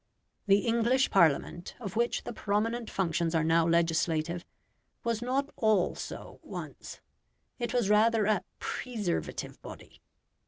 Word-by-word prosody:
The 200 +1 +5
English 235 +3 +2
Parliament, 170 0 +2
of 200 -5 -6
which 235 +1 0
the - - -6
prominent 220 +3 -1
functions 170 -2 0
are 160 - +3
now 165 +1 +3
legislative, 170 0 +1 0.6
was 230 -1 -1
not 270 +4 -1
all 215 -5 +3
so - - -8
once. - - -8 0.6
It 240 -2 -2
was 240 -4 +1
rather 215 +1 +4
a 210 -3 +2
PRESERVATIVE 215 -9 -3
body. - - -12
210 Hz, 125 wpm, -30 LUFS, 170-235 Hz, 0.6 s, The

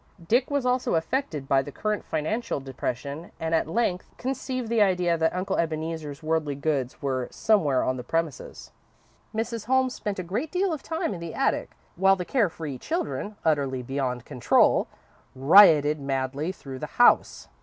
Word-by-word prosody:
Dick 245 +5 +2
was 285 -3 0
also 250 -5 +1
affected 160 - -2
by 135 0 +3
the 145 - -8
current 215 +6 -2
financial 160 +7 -2
depression, 140 +4 -5
and 160 0 -2
at 160 - +2
length 185 -1 -1
conceived 255 -1 -3
the 230 -1 +2
idea 180 -3 +3
that 160 +1 0
Uncle 190 +1 -1
Ebeneezer's 160 -2 -3
worldly 155 -2 0
goods 140 -3 -2
were 130 -2 -1
somewhere 155 -12 +2
on 130 - -1
the 125 - -6
premises. 165 -3 -4 0.6
Mrs. 225 0 -3
Holmes 260 0 +2
spent 205 -2 -4
a 185 - -3
great 225 - -3
deal 370 -1 +1
of 300 - -5
time 320 -10 -2
in 180 - -6
the 170 -1 -7
attic, - - 0 0.2
while 195 +2 +5
the 180 -2 -5
care 230 -5 +2
free 155 -6 -6
children, 320 - -3
utterly 140 -5 +1
beyond 125 -2 -3
control, 125 - +3 0.5
rioted 150 0 +6
madly 135 +3 -2
through 135 -8 -9
the 150 - -4
house. 245 - +4
165 Hz, 165 wpm, -26 LUFS, 140-220 Hz, 0.6 s, rioted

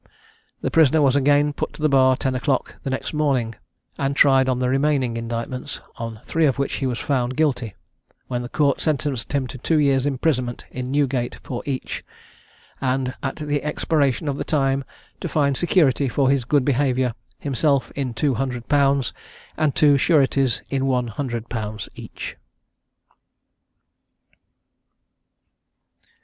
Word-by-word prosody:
The - - -1
prisoner 160 -1 +5
was 140 -2 +4
again 145 +1 +3
put - - -4
to - - -11
the - - +5
bar 130 -2 +5
at 130 - -5
ten 130 - +1
o'clock 130 +1 -1
the - - -4
next 130 +4 -3
morning, 135 -7 +1 0.5
and 140 0 0
tried 135 -2 +5
on 130 - +1
the 125 0 0
remaining 135 -2 +1
indictments, 115 +4 -4 0.2
on 115 -1 -6
three 160 -1 +2
of 135 - 0
which 140 0 -1
he 135 - -1
was 125 -2 -2
found 130 -2 -1
guilty; 125 -9 0 0.5
when 125 -1 -3
the 120 - -6
Court 140 -1 +1
sentenced 145 -5 -1
him 140 -2 +1
to 125 +1 -8
two 160 +6 +1
years' 140 -2 +3
imprisonment 130 -3 -1
in 125 0 -5
Newgate 135 -3 0
for 125 - -4
each, 135 -2 -3 0.8
and 130 -1 0
at 135 - -3
the 145 -2 -2
expiration 150 -2 0
of 140 -1 -2
the - - -1
time 135 -2 +1 0.4
to - - -4
find 140 -3 +2
security 145 -5 +2
for 135 +1 +2
his 135 -4 +1
good 140 0 +2
behaviour, 130 -3 +1 0.2
himself 140 0 0
in 130 -4 -3
two 140 +3 +1
hundred 125 -1 -3
pounds, 140 -3 +2 0.4
and 155 -3 +1
two 145 -2 +5
sureties 135 -5 +2
in 135 -1 0
one 125 -2 +1
hundred 120 -1 -4
pounds 105 -3 -4
each. - - -8
135 Hz, 155 wpm, -22 LUFS, 125-145 Hz, 0.8 s, prisoner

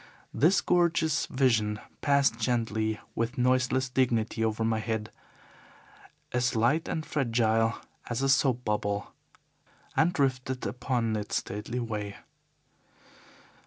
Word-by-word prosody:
This 165 - +4
gorgeous 170 -3 +2
vision 110 -5 +1 0.2
passed 140 -1 +3
gently 110 -3 0
with 115 +4 -2
noiseless 130 +1 +2
dignity 120 -3 0
over 110 0 0
my 110 -1 +1
head, 110 0 -3 1.2
as 125 0 0
light 120 +9 +2
and 160 -1 -3
fragile 115 -4 +1 0.3
as 120 +2 -1
a 135 - +2
soap 130 -2 +2
bubble, 105 -1 -2 0.8
and 160 +2 +4
drifted 130 -4 -1
upon 115 +1 -1
its 105 -1 -3
stately 105 +5 -3
way. 105 -4 -4
120 Hz, 110 wpm, -28 LUFS, 110-130 Hz, 1.2 s, This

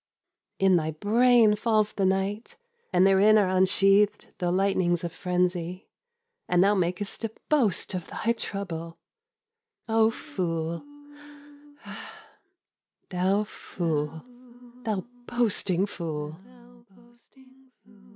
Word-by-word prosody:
In 190 -2 +4
thy 155 -1 -1
brain 220 +6 +4
falls 215 -1 +1
the 195 -2 +1
night, 200 - -2 0.3
And 180 0 +4
therein 195 +3 +5
are 205 -3 +3
unsheathed 195 +2 +3
the 180 -2 0
lightnings 185 -2 +1
of 170 - -3
frenzy, 180 0 -2 0.6
And 180 +1 +4
thou 200 +1 +4
makest 185 +3 -2
a 225 - -1 0.2
boast 235 - +1
of 180 -2 -4
thy 230 - -1
trouble! 170 -7 -5 0.9
Oh 225 0 +4
fool, 165 -6 -4 2.3
thou 190 +3 +1
fool, 160 -6 -4 0.6
thou 210 -4 -2 0.2
boasting 205 -6 +1
fool! 155 -4 -6
190 Hz, 95 wpm, -26 LUFS, 175-210 Hz, 2.3 s, therein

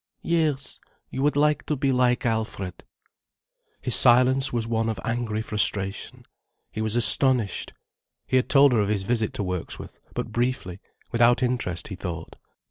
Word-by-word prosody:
"Yes, 155 -5 0 0.3
you 130 - -4
would 145 +1 +2
like 150 +1 +2
to 150 - 0
be 135 0 0
like 125 0 +1
Alfred." 110 -5 -3 1.0
His - - 0
silence 130 +2 +5
was 120 -2 -1
one 115 0 -1
of 110 -4 -4
angry 115 -2 -2
frustration. 100 -2 -2 0.5
He 110 - -5
was 110 0 0
astonished. 120 -1 +2 0.5
He 130 - +1
had 130 - 0
told 140 -1 +6
her 120 - +2
of 100 -1 0
his 105 -2 0
visit 110 +1 0
to - - -2
Wirksworth, 90 -2 -6 0.2
but - - -4
briefly, 120 -7 -2 0.3
without 120 +2 +3
interest, 120 -10 -2
he 95 - -5
thought. 85 -2 -7
120 Hz, 155 wpm, -24 LUFS, 105-130 Hz, 1.0 s, told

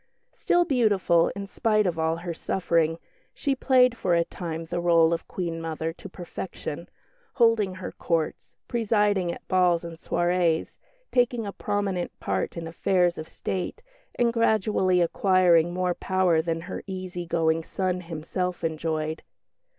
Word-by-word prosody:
Still 350 0 +2
beautiful, 205 - +3
in 200 0 -5
spite 215 +1 +1
of 170 -3 -1
all 160 0 +1
her 170 0 -5
suffering, 165 -2 0 0.4
she 280 - 0
played 255 -2 +4
for 180 -6 +1
a 170 - +3
time 165 -2 -5
the 175 +1 -3
rôle 170 -1 +4
of 165 - -4
Queen 170 -3 -4
mother 160 0 -3
to - - -11
perfection, 175 -2 -7 0.5
holding 225 -6 +3
her 185 -1 -6
Courts, 165 -2 -2
presiding 210 -6 +1
at - - -10
balls 180 -2 +3
and 170 -1 -7
soirées, 175 -1 0 0.3
taking 245 -2 +2
a 200 - -5
prominent 195 -3 -2
part - - -2
in 165 - -4
affairs 175 +1 +1
of 155 - -7
State, 190 - -4 0.3
and 235 -1 +2
gradually 210 -5 +2
acquiring 175 -1 +3
more 180 0 0
power 185 -3 +2
than 165 0 -2
her - - -6
easy 185 -2 -5
going 165 -1 +1
son 185 +1 -2
himself 175 +2 -4
enjoyed. 160 -1 -2
180 Hz, 145 wpm, -26 LUFS, 165-200 Hz, 0.5 s, played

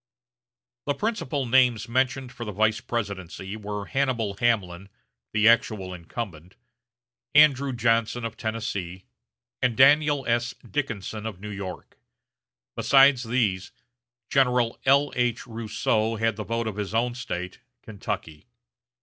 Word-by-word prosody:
The 145 - +1
principal 155 - -2
names 125 -2 +3
mentioned 130 +1 0
for 120 - -7
the 105 - -5
vice 110 +2 +1
presidency 100 -3 -4
were 105 -1 -5
Hannibal 125 -7 -1
Hamlin, 100 -6 0 0.4
the 105 +1 +3
actual 110 -5 +2
incumbent; 90 -1 -7 0.8
Andrew 140 -2 +5
Johnson 115 0 +1
of 115 -1 -5
Tennessee; 100 -5 -4 0.6
and 120 -3 +1
Daniel 145 0 +5
S. 120 +2 0
Dickinson 110 -6 -3
of 100 -5 -7
New 105 +1 -7
York. 100 -3 -8 0.8
Besides 135 -2 +5
these, 110 -6 0 0.6
General 125 -3 +2
L.H. 130 -4 +2
Rousseau 110 0 -1
had 115 0 0
the 105 0 -6
vote 115 0 -2
of 110 -2 -4
his 105 +1 -3
own 120 +1 +1
State 90 -7 -5 0.2
Kentucky. 85 -6 -6
115 Hz, 120 wpm, -25 LUFS, 105-125 Hz, 0.8 s, Andrew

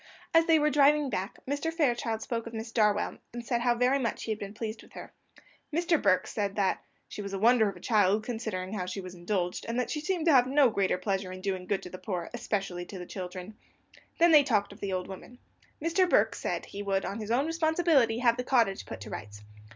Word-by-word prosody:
As 330 0 +5
they 325 -1 +6
were 300 0 +2
driving 290 0 +4
back, 195 0 -3
Mr. 285 +4 -1
Fairchild 240 -8 0
spoke 230 -1 -3
of 230 - -8
Miss 225 +1 -5
Darwell, 210 -3 +1
and 240 0 -6
said 235 0 0
how 240 0 +2
very 250 +3 +2
much 235 -3 -2
he 225 - -3
had 215 - -3
been 200 +1 -7
pleased 220 0 -5
with - - -19
her. - - -10 0.6
Mr. 335 0 +1
Burke 185 -2 +3
said 200 -2 -3
that 195 -2 0 0.2
"she - - -7
was 200 -1 -6
a - - -1
wonder 225 +1 +4
of 195 - -8
a - - -12
child, 210 -2 +2
considering 220 -5 -4
how 185 -4 -3
she 185 +2 -4
was 185 -1 -8
indulged, 180 0 -2
and 235 +2 -1
that 250 - -2
she 300 - -2
seemed 350 -1 -1
to 325 - +5
have 250 -2 +6
no 270 -2 +4
greater 195 -3 +1
pleasure 190 +1 -2
than 185 - -6
in 185 - -10
doing 185 -2 -3
good 200 0 -1
to - - -8
the 185 - -8
poor, 180 -5 -4
especially 195 -7 -3
to 190 - -9
the 180 - -7
children." 185 +2 -7 0.6
They 340 - +6
then 300 -2 +8
talked 210 -7 0
of 200 - -16
the 200 - -3
old 185 -1 -2
woman. 195 +6 -10 0.4
Mr. 335 +4 +2
Burke - - +4
said - - -3
he 200 - -7
would, 195 -1 -1
on 200 - -4
his 215 -1 -6
own 250 +5 +2
responsibility, 320 -7 +2
have 235 0 +3
the 250 - -2
cottage 230 -7 +1
put - - -7
to - - -8
rights. 105 -1 -8
220 Hz, 245 wpm, -29 LUFS, 195-265 Hz, 0.6 s, then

